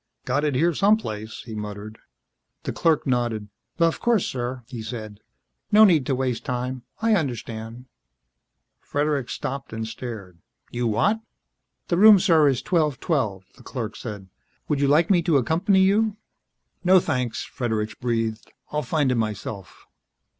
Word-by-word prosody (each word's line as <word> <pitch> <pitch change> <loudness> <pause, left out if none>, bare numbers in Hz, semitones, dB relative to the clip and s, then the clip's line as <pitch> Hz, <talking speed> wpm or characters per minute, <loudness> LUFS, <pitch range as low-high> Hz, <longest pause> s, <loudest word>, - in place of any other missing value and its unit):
"Got 140 +4 0
it 150 -3 0
here 170 +6 +3
some 205 +7 +4
place," 110 - -7
he 115 - -9
muttered. 105 0 -7 0.6
The - - -3
clerk 160 -3 +2
nodded. 120 -5 -1 0.3
"Of 165 -1 +2
course, 235 -5 +2
sir," 125 0 -4
he 120 -2 -7
said. 110 -2 -7 0.5
"No 215 +1 +8
need 165 - +5
to 135 - +1
waste 125 -2 -2
time. 125 +1 -3 0.2
I 225 -1 +4
understand." 120 - -3 0.9
Fredericks 145 -5 -1
stopped 135 +1 -5
and 110 0 -4
stared. 110 -7 -8 0.3
"You 120 0 -1
what?" 200 - +2 0.7
"The 175 - +2
room, 215 0 +9
sir, 165 -5 +4
is 130 -3 +1
1212," 145 - 0
the - - -16
clerk 115 -4 -5
said. 105 -5 -7 0.4
"Would 145 - 0
you 140 - +3
like 160 +6 +4
me 175 -3 +4
to 165 -3 +3
accompany 180 - +2
you 210 +2 +2 0.3
" - - -48
"No 185 +1 +6
thanks," 125 -7 -2
Fredericks 110 -4 -2
breathed. 115 -2 -2 0.2
"I'll 150 - 0
find 140 0 +1
it - - +1
myself." 105 -2 -6
130 Hz, 155 wpm, -24 LUFS, 110-165 Hz, 0.9 s, room